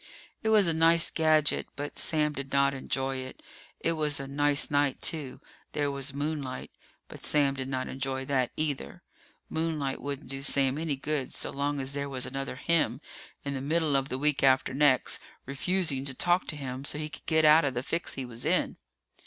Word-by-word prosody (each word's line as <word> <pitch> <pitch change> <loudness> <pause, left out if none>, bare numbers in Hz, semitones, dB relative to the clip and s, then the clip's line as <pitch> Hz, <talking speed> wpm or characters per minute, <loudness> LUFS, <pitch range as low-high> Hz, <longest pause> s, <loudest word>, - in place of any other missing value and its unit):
It 220 - 0
was 210 -4 +5
a 165 - +2
nice 165 +1 +5
gadget, 155 -2 +2
but 145 +1 -4
Sam 150 -2 +1
did 140 -1 -6
not 140 0 +3
enjoy 135 0 -2
it. 130 0 -8 0.4
It 165 - 0
was 150 -3 +1
a 135 - -5
nice 145 +1 +3
night, 145 -2 +2
too. 150 -6 -1 0.3
There 145 -1 0
was 140 0 -2
moonlight. 140 -2 -4 0.4
But - - -12
Sam 145 -2 +2
did 135 -1 -5
not 130 -1 -2
enjoy 135 0 -3
that, 130 -3 +1
either. 145 - -3 0.4
Moonlight 155 -4 -2
wouldn't 140 0 -5
do 135 +1 -6
Sam 135 0 +2
any 160 -3 -1
good 140 -1 -3
so - - -2
long 145 +1 -1
as 135 +1 -2
there 140 0 -3
was 130 -2 -4
another 135 0 -4
him 165 +4 +1 0.5
in 140 - -2
the 135 - -4
middle 155 +1 +1
of 135 0 0
the 130 - -2
week 150 +1 +2
after 130 -1 +3
next, 135 -2 +3 0.3
refusing 140 0 0
to 135 -2 -3
talk 175 +5 +2
to 160 - -4
him 130 -2 -6
so 145 - -1
he 150 0 -3
could 150 - -12
get 160 -1 +3
out 155 +2 +7
of 135 -3 -1
the 125 - -2
fix 165 +4 -2
he 135 - -4
was 120 0 -6
in. - - 0
140 Hz, 200 wpm, -29 LUFS, 135-155 Hz, 0.5 s, out